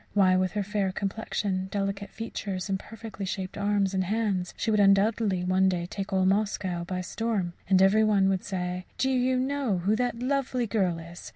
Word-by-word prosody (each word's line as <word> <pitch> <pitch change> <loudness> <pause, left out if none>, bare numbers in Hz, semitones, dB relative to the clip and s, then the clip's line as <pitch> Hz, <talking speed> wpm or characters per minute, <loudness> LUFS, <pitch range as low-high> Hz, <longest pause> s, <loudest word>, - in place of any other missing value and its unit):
Why, 185 -2 +5
with 185 -1 +1
her 210 -1 0
fair 200 -1 -1
complexion, 195 -1 -2
delicate 200 0 -2
features, 200 -4 -5
and 190 -1 0
perfectly 225 -1 -8
shaped 190 0 -4
arms 200 -1 +1
and 190 -1 0
hands 200 -3 -1
she 225 - 0
would 210 - +3
undoubtedly 200 -1 +3
one 185 +1 +3
day 175 -2 -1
take 195 +2 -5
all 190 -1 +2
Moscow 190 -3 0
by 185 +1 -3
storm; 195 -2 -2 0.2
and 190 -1 +5
every 210 +3 +5
one 205 -3 +3
would 190 -1 0
say, 180 -1 -4
"Do 265 - +1
you 255 0 +2
know 265 -6 0
who 195 +5 +1
that 245 -1 -1
lovely 255 -1 0
girl 195 -6 0
is? 170 +1 -10
195 Hz, 190 wpm, -27 LUFS, 185-220 Hz, 0.2 s, Why